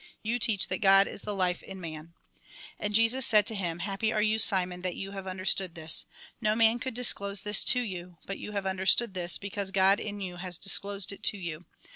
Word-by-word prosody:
You 235 +3 -1
teach 215 -4 +2
that 185 - -3
God 195 0 +5
is - - -3
the 210 -1 -5
life 180 -2 -1
in 195 -1 -10
man." 165 -1 -9 0.6
And 210 0 -3
Jesus 230 +4 +3
said 210 -3 +5
to 225 - -3
him: 175 -5 -3
" - - -3
Happy 200 +2 -1
are 215 - 0
you, 220 +1 +1
Simon, 180 -4 +3
that 185 -1 -3
you 195 0 -7
have 195 -1 -8
understood 185 -1 -1
this. 160 -1 -1 0.3
No 215 -1 +1
man 225 +1 +3
could 260 -3 -5
dis 250 0 +4
close 200 -1 -4
this 210 0 +4
to 250 - +5
you; 180 -6 -7
but 195 - -6
you - - -7
have 200 -1 -3
understood 190 +3 +1
this, 175 -3 +2
because 200 -1 -4
God 195 +1 +3
in 205 -1 -6
you 180 -2 -6
has 180 -1 -3
disclosed 200 0 +1
it 200 - -12
to 205 - +3
you. 170 -2 -7
195 Hz, 230 wpm, -28 LUFS, 185-210 Hz, 0.6 s, God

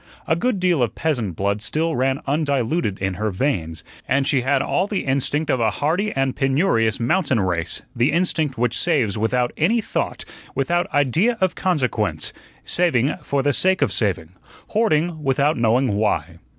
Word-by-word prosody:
A 160 - +1
good 225 +3 0
deal 180 -6 +2
of 120 - 0
peasant 120 - -1
blood 100 +3 -1
still 155 +10 -1
ran 130 +2 0
undiluted 140 - 0
in 95 -1 -2
her 105 +4 -2
veins, 90 - -2 0.2
and 135 +1 +1
she 135 -2 +2
had 135 +2 +2
all 185 +2 0
the 205 -2 -2
instinct 145 +3 0
of 130 - +1
a 115 -1 +2
hardy 175 - -1
and 135 -1 0
penurious 135 - +1
mountain 130 +1 +1
race 90 -3 -1
the 120 +5 +2
instinct 160 -5 0
which 120 0 0
saves 105 -5 +1
without 120 +3 0
any 210 +10 +2
thought, 220 - -3 0.3
without 170 +6 0
idea 160 - +2
of 185 -2 +1
consequence 150 - -1 0.3
saving 150 -7 +2
for 140 -1 -2
the 145 +1 +2
sake 190 +4 +2
of - - 0
saving, 90 -6 -1 0.4
hoarding 170 -7 +1
without 140 +2 +1
knowing 120 +1 +2
why. 105 +1 -1
135 Hz, 165 wpm, -21 LUFS, 115-165 Hz, 0.4 s, deal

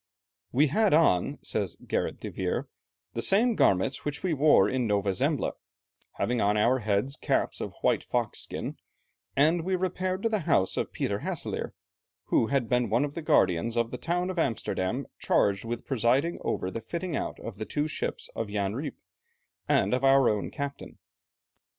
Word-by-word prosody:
"We 140 +5 +4
had 195 +4 +3
on," 145 - +3
says - - -1
Gerrit - - -1
de - - -6
Veer, - - -2 0.5
"the - - -2
same 230 +5 +4
garments 100 - +2
which 145 +3 -4
we 180 -3 +1
wore 150 +1 +5
in 130 -2 0
Nova 100 -2 +1
Zembla, - - 0 0.6
having 120 0 0
on 105 +1 +2
our 120 +5 +3
heads 105 +5 0
caps - - -1
of - - -5
white - - +2
fox 120 -3 -1
skin, - - -5 0.6
and 160 +4 +3
we 185 +2 0
repaired 185 +1 -2
to 230 - +2
the 215 -1 +1
house 95 -9 +3
of - - -2
Peter - - -2
Hasselaer, - - -3 0.6
who 115 - +3
had 135 -3 0
been 125 -2 +1
one 120 +7 +2
of 145 - -6
the 170 - -5
guardians 115 - +2
of 115 0 +1
the 125 - -5
town 180 +2 -1
of 185 - -3
Amsterdam 115 - -1
charged 100 +1 +2
with 120 +1 -4
presiding 135 +6 +1
over 95 - -2
the 115 - -5
fitting 170 +8 -4
out - - -3
of 110 -3 -8
the 110 - -3
two 150 +5 -1
ships 155 - -4
of 115 - -3
Jan 100 -1 -1
Rijp 140 +5 -4 0.7
and - - +3
of 130 +1 0
our 135 -1 +6
own 105 -2 -1
captain. 140 0 -6
130 Hz, 180 wpm, -28 LUFS, 110-160 Hz, 0.7 s, our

